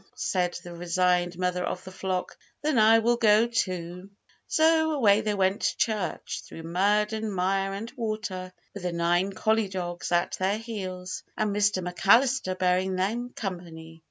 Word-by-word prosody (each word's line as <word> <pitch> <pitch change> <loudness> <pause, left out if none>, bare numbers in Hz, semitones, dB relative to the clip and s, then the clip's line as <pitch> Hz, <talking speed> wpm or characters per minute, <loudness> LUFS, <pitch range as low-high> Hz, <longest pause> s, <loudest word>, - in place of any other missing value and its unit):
said 180 -2 -1
the 175 - -9
resigned 175 0 +1
mother 180 0 -1
of 180 - -4
the 185 - -9
flock; 185 -1 -3 0.3
"then 300 -5 +2
I 220 +1 +7
will 235 +1 +2
go 220 -1 +5
too!" 185 -5 -3 0.4
So 315 0 +3
away 215 -7 +4
they 210 -1 -1
went 190 +1 +1
to - - 0
church, 210 -6 -2
through 165 - -10
mud 205 +6 +1
and 220 -1 -3
mire 195 +1 0
and 220 +4 -6
water, 215 -5 -4 0.2
with 200 - -7
the 180 -1 -2
nine 175 +3 +1
collie 220 +1 +1
dogs 175 -2 -4
at 175 0 +1
their 190 +2 +1
heels, 190 -5 -6 0.2
and 210 -2 0
Mr 205 -3 +1
McAllister 200 +2 +3
bearing 185 +1 +1
them 225 +7 -1
company. 165 -4 -7
190 Hz, 160 wpm, -27 LUFS, 180-215 Hz, 0.4 s, I